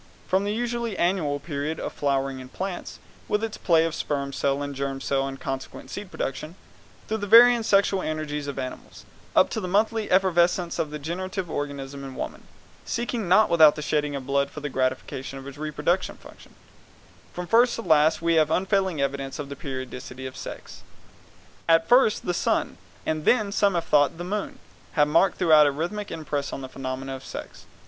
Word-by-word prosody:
From 190 +2 +1
the 205 - -1
usually 235 -1 -2
annual 170 -5 +1
period 145 +1 -4
of - - -4
flowering 135 -2 -1
in 130 0 -10
plants, 185 +4 -5 0.3
with 210 +1 0
its 225 -1 -4
play 165 -2 +4
of 165 - -2
sperm 140 -3 -3
cell 140 +1 0
and 145 0 -4
germ 135 0 -3
cell 135 0 0
and 135 0 -7
consequent 135 -1 -6
seed 205 -2 -6
production, 155 0 -4 0.5
through 220 - -1
the 205 - -4
varying 240 +2 +8
sexual 200 -3 +3
energies 150 -2 -3
of 140 - -5
animals, 130 -1 -7 0.3
up - - +5
to 220 - -2
the 185 - -3
monthly 215 +3 +1
effervescence 175 -2 +2
of 155 - 0
the 150 - -5
generative 180 +3 -4
organism 140 -1 -5
in 135 -1 -8
woman, - - -6 0.4
seeking 235 -3 -3
not 200 +5 +5
without 160 -3 +6
the 150 - -5
shedding 150 -1 0
of 135 -2 -5
blood 140 +1 +1
for 150 - -8
the 145 0 -4
gratification 130 +1 -2
of 135 - -9
its 140 +1 -10
reproductive 155 +4 -1
function, - - -16 0.8
from 180 - -5
first 235 +5 +4
to 230 - -5
last 160 -1 +3
we 170 -1 +3
find 155 -1 +4
unfailing 190 -1 +1
evidence 140 0 -2
of 145 -2 -6
the 140 - -6
periodicity 130 -1 -7
of 130 - -7
sex. - - -9 0.9
At 165 0 +5
first 245 -3 +4
the 175 - 0
sun, 130 - 0 0.3
and 155 -1 -1
then, 215 0 +3
as 200 - -5
some 200 -3 +3
have 170 - -1
thought, 145 +1 +3
the 175 - -5
moon, 200 +3 -3 0.4
have 150 -3 +4
marked 165 +5 +3
throughout 155 -4 +6
a - - +2
rhythmic 175 +8 -4
impress 145 -3 -3
on - - -5
the 130 - -7
phenomena 135 0 -5
of 135 - -10
sex. - - -9
155 Hz, 195 wpm, -25 LUFS, 140-190 Hz, 0.9 s, varying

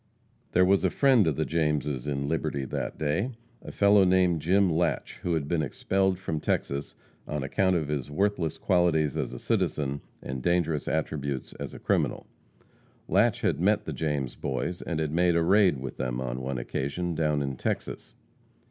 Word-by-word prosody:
There 90 - +5
was 95 +1 +3
a - - +3
friend 130 - +4
of 80 - +1
the - - 0
Jameses 75 -5 -1
in 70 -1 -2
Liberty 70 -3 -1
that - - -4
day 90 - -1 0.3
a - - -8
fellow 100 0 +5
named 90 -3 +3
Jim 95 +4 +3
Latche, 85 0 -1
who 85 -1 0
had 75 -3 -2
been 85 0 +1
expelled 95 +6 0
from 80 -4 -3
Texas 70 -1 -2 0.3
on 75 -2 -3
account 95 +7 +1
of 80 -4 0
his 70 -2 -3
worthless 85 -1 0
qualities 85 -6 +2
as - - -2
a - - -7
citizen 70 -1 -1 0.2
and 65 0 -4
dangerous 80 -1 +1
attributes 70 -4 -2
as - - -6
a - - -9
criminal. - - 0 0.8
Latche - - +3
had - - +1
met - - +2
the - - -4
James 75 -5 -2
Boys, 85 +6 -3
and 85 -3 -3
had 80 -2 -1
made 85 +1 +3
a 85 - +3
raid 95 -3 +4
with 65 0 -6
them, 65 -1 -2
on 65 0 -3
one 65 0 -3
occasion, 70 +8 -3
down 75 -2 +1
in 70 -1 -3
Texas. - - -4
80 Hz, 180 wpm, -27 LUFS, 70-90 Hz, 0.8 s, There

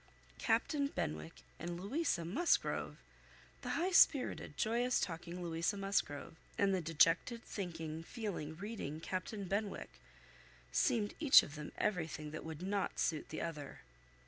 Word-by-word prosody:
Captain 285 -3 +2
Benwick 75 - -4 0.2
and 175 +1 -4
Louisa 205 - 0
Musgrove! 280 - +1 0.6
The - - -2
high 360 +3 +1
spirited, 290 -6 +4
joyous 240 +3 +2
talking 175 0 -4
Louisa 170 +4 0
Musgrove, 195 -6 -1 0.2
and 200 -1 +3
the 185 - +1
dejected, 165 +8 +3
thinking, 165 -5 -5
feeling, 170 -6 -4
reading, 190 -6 -5
Captain 190 +5 -3
Benwick, 200 +2 -3 0.7
seemed 225 -6 +2
each 300 -3 +9
of 145 - -8
them 150 0 -6
everything 160 -6 -1
that 155 - -6
would 160 +1 -6
not 195 +1 -1
suit 155 -2 0
the 155 - -4
other. 150 -4 -5
180 Hz, 130 wpm, -36 LUFS, 160-215 Hz, 0.7 s, each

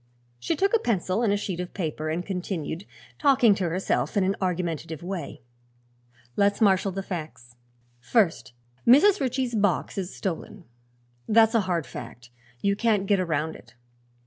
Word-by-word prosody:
She 120 - -1
took 395 +7 +2
a - - +3
pencil 200 - 0
and 205 -3 +2
sheet 185 -4 -4
of 180 0 -6
paper 155 -4 -3
and 170 +3 -2
continued, 180 -3 -4 0.3
talking 260 -6 +5
to 185 -3 -1
herself 185 +4 -1
in 200 - +4
an 195 +1 +1
argumentative 170 -3 -2
way: 175 -4 -5 0.9
"Let's 200 0 +2
marshal 195 -2 +3
the 195 +1 -4
facts. 155 -10 -7 0.4
First, 160 - +1 0.3
Mrs. 370 +12 +6
Ritchie's 255 -1 -1
box 205 -3 0
is 185 -1 -4
stolen. 190 +1 -5 0.7
That's 225 +1 +5
a 230 - +4
hard 170 -4 0
fact; 120 -1 -10 0.3
you 200 0 +2
can't 210 -2 +1
get 200 -1 +2
around 160 -3 -1
it. 120 0 -16
190 Hz, 150 wpm, -26 LUFS, 165-215 Hz, 0.9 s, Mrs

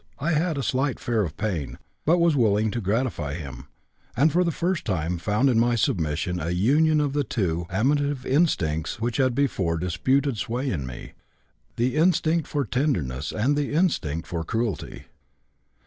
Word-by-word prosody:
I 150 +5 -1
had 165 0 +1
a 135 - -2
slight 130 +1 0
fear 115 -2 0
of 85 -7 -4
pain, 95 -10 -3 0.3
but 170 +3 +5
was 170 -3 +3
willing 110 -3 +2
to 120 - -3
gratify 100 - -1
him, 70 -7 -8 0.5
and 150 +5 +4
for 180 +3 +3
the 170 - +1
first 175 +2 -1
time 90 -3 -2
found 105 +9 +1
in 120 -4 +3
my 120 +1 +3
submission 85 -4 0
a 80 +1 -3
union 145 - +3
of 145 -2 0
the 145 0 +1
two 85 -8 -2
amative 140 +6 0
instincts 95 - +1
which 115 +1 -1
had 130 -3 +2
before 95 -12 0
disputed 130 - 0
sway 125 +5 -2
in 70 -8 -3
me: - - -9 0.6
the 125 +3 0
instinct 165 -1 +2
for 145 -2 -1
tenderness 85 - -1
and 125 +7 +1
the 145 0 -1
instinct 85 - 0
for 85 -2 -4
cruelty. 110 0 -3
120 Hz, 170 wpm, -25 LUFS, 90-145 Hz, 0.6 s, but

